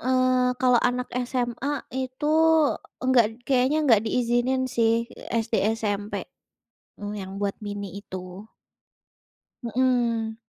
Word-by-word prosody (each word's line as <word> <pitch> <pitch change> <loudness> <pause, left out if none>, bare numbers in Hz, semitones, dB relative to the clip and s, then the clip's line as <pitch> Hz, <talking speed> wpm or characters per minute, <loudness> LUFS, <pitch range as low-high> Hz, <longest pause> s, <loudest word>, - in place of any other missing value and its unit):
eee, 255 0 +2
kalau 250 -2 +4
anak 250 0 -3 0.2
SMA 255 +3 -2
itu 260 +2 -4 0.8
enggak 255 -3 +5
d - - -11 0.2
kayaknya 260 +2 +3
enggak 230 -7 +5
diizinin 245 +3 +1 0.2
sih. 225 -1 +4 0.2
Eee, - - -6
SD, 225 - -5 0.2
SMP, 205 -2 -3 0.9
eee, 205 0 -4
yang 190 -1 -7
buat 200 -1 -1
mini 205 -1 -5
itu. 185 0 -9 1.2
Mhm. 235 -2 0
240 Hz, 115 wpm, -25 LUFS, 215-255 Hz, 1.2 s, enggak